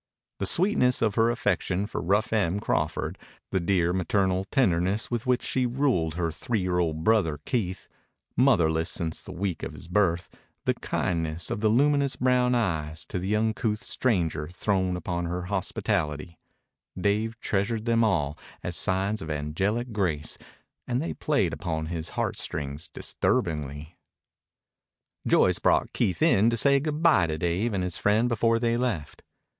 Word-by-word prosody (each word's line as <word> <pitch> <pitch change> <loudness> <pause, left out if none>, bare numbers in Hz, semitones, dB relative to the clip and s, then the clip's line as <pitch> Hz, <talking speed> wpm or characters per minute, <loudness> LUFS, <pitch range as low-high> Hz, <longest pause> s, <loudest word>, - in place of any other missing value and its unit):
The 100 - 0
sweetness 165 - +3
of 110 -3 +2
her 115 +2 +3
affection 100 -4 0
for 105 - -4
rough 100 +8 +1
Em 100 -3 +1
Crawford, - - -1 0.3
the 95 - +1
dear, 85 -1 +1
maternal 95 0 +1
tenderness 95 -3 +1
with 120 0 -2
which 125 0 +2
she 130 -1 0
ruled 120 - 0
her 85 -1 -1
three 110 +8 -2
year 90 -1 0
old 80 -2 -1
brother 90 -8 +3
Keith, 95 -7 -2 0.5
motherless 85 -11 +3
since 80 -2 -3
the - - -9
week 95 -1 -3
of - - -5
his - - -11
birth, 90 -2 +1 0.3
the - - +3
kindness 80 -2 -2
of 105 - -2
the 110 - +3
luminous 140 +3 +3
brown 125 -1 +2
eyes 80 -8 -1
to - - -4
the 95 +4 0
uncouth 110 0 0
stranger 85 -11 0
thrown 95 +1 0
upon 85 0 -3
her 90 +1 -3
hospitality: 85 -4 -2 0.6
Dave 110 +4 0
treasured 110 +2 -1
them 115 -1 +3
all 80 -9 0 0.2
as - - -3
signs 95 +3 +1
of 80 - -6
angelic 95 - -1
grace, 80 -7 -1 0.5
and 125 0 0
they 160 - -2
played 140 - 0
upon 80 -3 -3
his 80 0 -4
heartstrings 70 +2 -3
disturbingly. 75 0 -2 1.3
Joyce - - +4
brought - - +2
Keith 95 - 0
in 115 -9 +5
to 115 - 0
say 140 +5 +5
good 150 +2 -3
bye 155 - +5
to 80 -1 -2
Dave 90 +8 0
and 95 - 0
his 90 -1 -2
friend 105 +4 +2
before 115 -1 +2
they 115 0 +1
left. 115 - -3
95 Hz, 155 wpm, -27 LUFS, 85-115 Hz, 1.3 s, in